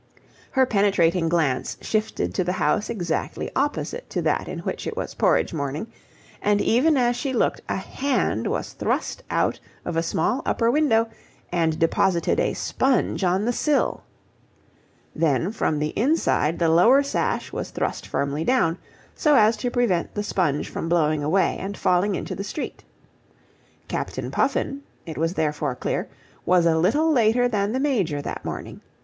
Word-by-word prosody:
Her 265 -1 +3
penetrating 190 -6 +2
glance 155 -7 0
shifted 215 0 -2
to 185 - 0
the 180 +1 -1
house 210 +2 0
exactly 175 -8 -3
opposite 290 - -2
to - - -2
that - - 0
in - - -5
which - - -4
it - - -5
was - - -4
porridge - - +2
morning, 145 +3 -3 0.6
and 205 0 +2
even 275 +9 +3
as 245 -1 +2
she 265 +2 -2
looked 240 - +1
a - - 0
hand 275 0 -1
was - - -3
thrust - - -2
out - - 0 0.3
of 175 - -3
a 165 - +2
small 165 +10 0
upper 230 0 +1
window 240 -6 +3 0.4
and 165 -3 +1
deposited 170 +1 +2
a - - 0
sponge 260 -6 0
on 185 +3 +2
the 245 - +1
sill. 295 +3 +1 1.1
Then 165 +3 +1
from 160 -8 0
the 150 +1 -1
inside 230 - +1
the 170 - +2
lower 225 - +5
sash 280 - -2
was - - -4
thrust - - -3
firmly 140 +2 -1
down, 175 -7 +2 0.3
so 300 -2 +3
as 220 -2 +5
to 245 - -2
prevent 240 -9 0
the 205 - -1
sponge 170 -8 0
from 165 - -4
blowing 155 -3 +2
away 185 +6 +1
and 200 +1 -5
falling 185 +3 +2
into - - -4
the 195 - -4
street. 290 - -6 1.0
Captain - - -4
Puffin, 280 - 0 0.2
it 160 -4 -6
was 165 +3 0
therefore 150 -3 -1
clear, - - -2 0.3
was 180 -1 +3
a 165 -1 +4
little 290 - +3
later 245 -2 +3
than 205 -3 0
the 255 - -1
Major 205 - 0
that 145 - -5
morning. - - -6
195 Hz, 165 wpm, -24 LUFS, 165-245 Hz, 1.1 s, lower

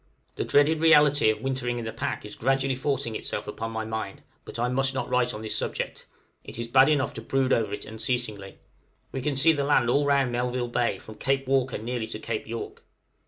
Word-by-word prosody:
The - - -1
dreaded 150 +2 +3
reality 150 -6 +6
of 110 - -1
wintering 130 -2 -1
in 120 - -4
the 110 - -4
pack 115 - -3
is 105 - -9
gradually 135 +2 +1
forcing 130 -3 -1
itself - - -3
upon 115 0 -4
my 110 0 -3
mind, 110 -3 -5 0.2
but - - -8
I 120 +1 +1
must 135 +1 0
not 130 - -2
write 125 -1 +2
on 105 - -7
this 110 - -1
subject, - - -3 0.4
it - - -8
is 115 0 -4
bad 130 +4 +6
enough 145 -2 +1
to 115 - -7
brood 135 +3 +1
over 110 -3 +1
it 105 - -5
unceasingly. 110 -3 -3 0.5
We 135 - -4
can 145 +1 -1
see 155 +5 +5
the 145 -2 -1
land 130 -4 +3
all 145 +2 +2
round 140 -3 +3
Melville 125 0 -1
Bay, 120 0 0
from 110 -1 -13
Cape 135 0 0
Walker 135 -2 +1
nearly 115 +1 -3
to 110 - -5
Cape 110 -1 -4
York. 115 +1 -6
125 Hz, 215 wpm, -26 LUFS, 115-135 Hz, 0.5 s, reality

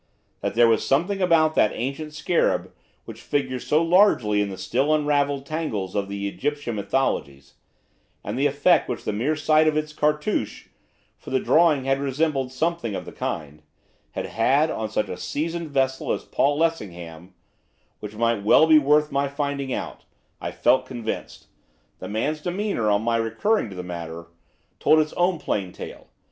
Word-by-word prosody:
That - - -3
there 120 0 +6
was 115 -1 +2
something 175 +8 +1
about 165 -3 +4
that 105 - +3
ancient 140 +5 -4
scarab, 165 +3 0 0.3
which - - -10
figures 130 -3 -2
so 155 +2 +3
largely 165 - +4
in 100 - -1
the 95 - -7
still 140 +6 +1
unravelled 145 -2 0
tangles 135 - -3
of 100 -1 -2
the 100 0 -3
Egyptian 145 +1 -3
mythologies, 70 - -2 0.7
and 105 - -4
the 140 +3 +2
effect 145 +5 +2
which 125 - -4
the - - -2
mere 130 +9 0
sight 155 +1 +3
of 155 -1 +2
its 155 0 -2
cartouch 150 - -1 0.5
for - - -11
the 130 - +1
drawing 155 -3 +3
had 135 +1 +1
resembled 140 -1 -1
something 130 -6 -2
of - - -5
the - - -9
kind 75 -2 -5 0.5
had - - -3
had 140 +8 +2
on 110 -1 -3
such 105 - -1
a 90 - -6
seasoned 165 - -3
vessel 135 -2 0
as - - -2
Paul 145 +1 +1
Lessingham, 90 - -3 0.6
which 105 0 -8
might 115 +1 +1
be - - -8
well 155 +9 +6
worth 150 +1 +3
my 140 0 +1
finding 140 -1 -3
out, - - -5 0.4
I - - -3
felt 130 - +2
convinced, 120 -3 -6 0.5
the - - -7
man's 150 +9 -2
demeanour, 180 - -1
on 105 +1 +2
my 115 0 +1
recurring 115 - 0
to 95 - -9
the 90 - -5
matter, 85 -1 -7 0.5
told 155 - +4
its 155 -1 +1
own 175 0 +1
plain 100 -10 -3
tale. - - -10
135 Hz, 170 wpm, -24 LUFS, 110-155 Hz, 0.7 s, there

